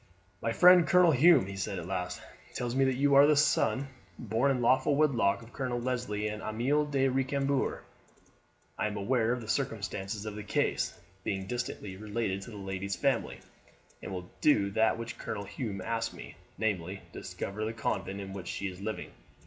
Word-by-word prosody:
"My 115 - 0
friend 180 +4 +7
Colonel 180 -2 +6
Hume," 150 - +6
he 100 0 -7
said 95 0 -3
at 85 - -5
last, 90 -1 -3 0.4
"tells 120 -1 -2
me 135 +1 +3
that 130 -1 +1
you 140 +2 +2
are 140 +1 +8
the 150 - +5
son, 140 -1 +2 0.3
born 115 +4 +1
in 135 -2 +1
lawful 130 +4 +3
wedlock, 120 -8 +2
of 115 - -15
Colonel 125 -3 -2
Leslie 120 -4 -2
and 105 0 -4
Amelie 135 +7 0
de 135 -2 +2
Recambours. 135 +1 0 1.0
I - - +1
am 105 0 -4
aware 115 +3 +1
of 125 0 -1
the 110 - -9
circumstances 105 -4 -2
of 105 - -4
the 105 - -5
case, 105 - -1 0.3
being 95 -1 -2
distantly 105 -4 -4
related 105 -2 -2
to 95 - -9
the 105 - -9
lady's 95 0 -3
family, 135 -4 0 0.6
and - - -7
will 90 -1 -5
do 100 -10 +4
that 110 +2 +2
which 115 +1 -6
Colonel 100 -1 -4
Hume 100 -3 -5
asks 115 +3 -2
me, - - -9 0.2
namely, 95 -3 -2
discover 105 +2 -5
the 110 - -1
convent 100 -3 -3
in 95 -1 -7
which 95 -3 -7
she 100 - -3
is 90 +1 -10
living. 110 +1 -4
115 Hz, 185 wpm, -30 LUFS, 100-130 Hz, 1.0 s, are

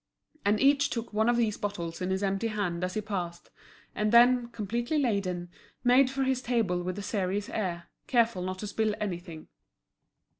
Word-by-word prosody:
And 205 +1 +2
each 280 +1 +4
took 230 -2 -4
one 220 +2 +2
of 240 - +3
these 220 -3 0
bottles 180 -5 -4
in 180 - -1
his 190 +1 -1
empty 195 +3 0
hand 190 -5 -2
as 180 0 -2
he 215 - 0
passed, 180 -5 -5 0.4
and 210 0 0
then, 240 +1 +6
completely 235 +6 -2
laden, 190 -9 -1 0.3
made 255 +2 +5
for 270 0 -1
his 260 -1 0
table 225 -8 0
with 180 +1 -4
a 205 - -4
serious 200 0 -2
air, 175 -5 -3 0.2
careful 230 -6 +2
not 185 +1 -3
to 210 - -5
spill 215 +1 0
anything. 175 -5 -5
210 Hz, 180 wpm, -29 LUFS, 185-235 Hz, 0.4 s, then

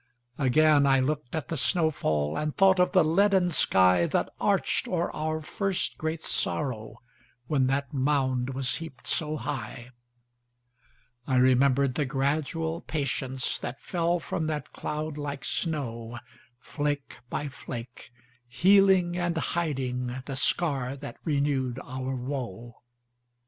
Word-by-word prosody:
Again 145 +1 +4
I 135 -1 +5
looked 145 0 -2
at 155 -6 -4
the 165 - -2
snow 160 +3 +2
fall, 75 - -1
And 150 -1 -2
thought 190 -1 +5
of 180 - +4
the 185 -4 +5
leaden 190 +3 +3
skyThat 90 - +3
arched - - +1
o'er - - -1
our 155 0 -2
first 195 +3 -2
great 160 0 -3
sorrow, 110 -7 0 0.5
When 135 -2 +1
that 135 +1 -1
mound 130 -2 0
was 130 -2 +1
heaped 160 -7 -10
so 155 -1 0
high.I 120 0 -9
remembered 130 +1 +4
the 145 - 0
gradual 155 +4 -1
patienceThat 135 -3 -2
fell 170 +1 0
from 160 -1 -3
that 150 -1 -4
cloud 150 0 -4
like 145 -1 -4
snow, 120 -8 -3 0.4
Flake 145 0 -3
by 150 - -3
flake, 125 -4 -8 0.4
healing 190 +4 +4
and 175 -1 -1
hidingThe 130 -5 -2
scar 135 -3 0
that 140 +1 -8
renewed 140 -4 0
our 130 +1 -4
woe. 120 -3 -5
140 Hz, 120 wpm, -27 LUFS, 125-155 Hz, 0.5 s, I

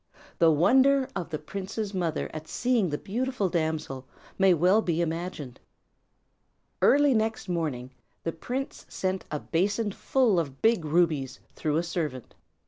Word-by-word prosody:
The 165 - +6
wonder 260 - +4
of 180 -4 -4
the 155 - -2
prince's 195 +6 -5
mother 170 -4 -1
at 155 0 -7
seeing 240 -7 +1
the 145 - -2
beautiful 230 - -2
damsel 155 -6 -2 0.3
may 195 0 +5
be - - +5
well 180 +6 +4
imagined. 165 - -2 1.2
Early 290 -1 +5
next 220 -2 -1
morning 150 -8 -2 0.3
the 165 - -1
prince 250 +11 -5
sent 185 0 -2
a 150 - -3
basin 200 +7 0
full 230 -2 +2
of 140 -5 -4
big 225 -7 +2
rubies, 150 -5 +1 0.2
through 155 -1 0
a 165 - +1
servant. 155 -7 -4
175 Hz, 140 wpm, -27 LUFS, 155-215 Hz, 1.2 s, The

